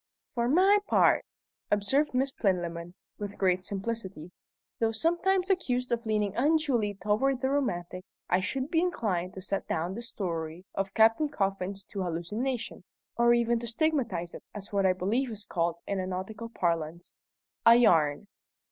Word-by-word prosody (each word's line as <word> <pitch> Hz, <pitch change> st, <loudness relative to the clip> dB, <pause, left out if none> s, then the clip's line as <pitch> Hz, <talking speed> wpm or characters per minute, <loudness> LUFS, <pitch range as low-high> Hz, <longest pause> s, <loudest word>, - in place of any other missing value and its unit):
"For 235 Hz, -1 st, 0 dB
my 380 Hz, +7 st, +5 dB
part," -, -, +4 dB, 0.4 s
observed 250 Hz, +8 st, +1 dB
Miss 265 Hz, +1 st, +1 dB
Plinlimmon, 175 Hz, -5 st, -2 dB, 0.2 s
with 205 Hz, -1 st, -5 dB
great 185 Hz, -1 st, +2 dB
simplicity, 195 Hz, -4 st, -5 dB, 0.5 s
"though 225 Hz, -1 st, +2 dB
sometimes 360 Hz, -, +1 dB
accused 250 Hz, -9 st, 0 dB
of 235 Hz, -1 st, -1 dB
leaning 210 Hz, -2 st, 0 dB
unduly 265 Hz, -7 st, +2 dB
toward 215 Hz, +8 st, +1 dB
the 265 Hz, 0 st, +1 dB
romantic, 185 Hz, -10 st, -2 dB, 0.2 s
I 180 Hz, -, +3 dB
should 260 Hz, +9 st, -3 dB
be 325 Hz, -, +3 dB
inclined 200 Hz, -, -1 dB
to 190 Hz, -, -7 dB
set 195 Hz, -, -2 dB
down 170 Hz, +3 st, -1 dB
this 235 Hz, +3 st, -7 dB
story 165 Hz, -2 st, -4 dB
of 195 Hz, 0 st, -3 dB
Captain 225 Hz, +7 st, +4 dB
Coffin's 195 Hz, -5 st, -2 dB
to 200 Hz, -, -5 dB
hallucination, 210 Hz, +9 st, -3 dB, 0.3 s
or 235 Hz, 0 st, +5 dB
even 235 Hz, 0 st, +2 dB
to 235 Hz, -, -6 dB
stigmatize 235 Hz, -, -1 dB
it -, -, -8 dB
as 205 Hz, 0 st, -7 dB
what 195 Hz, -1 st, +3 dB
I 185 Hz, -, +4 dB
believe 220 Hz, +9 st, 0 dB
is 215 Hz, -2 st, -7 dB
called 170 Hz, -1 st, 0 dB
in 200 Hz, -1 st, -2 dB
nautical 210 Hz, +5 st, -5 dB
parlance 170 Hz, -4 st, -2 dB, 0.4 s
'a 230 Hz, -, +8 dB
yarn.'" 165 Hz, -6 st, +3 dB
210 Hz, 155 wpm, -29 LUFS, 185-250 Hz, 0.5 s, a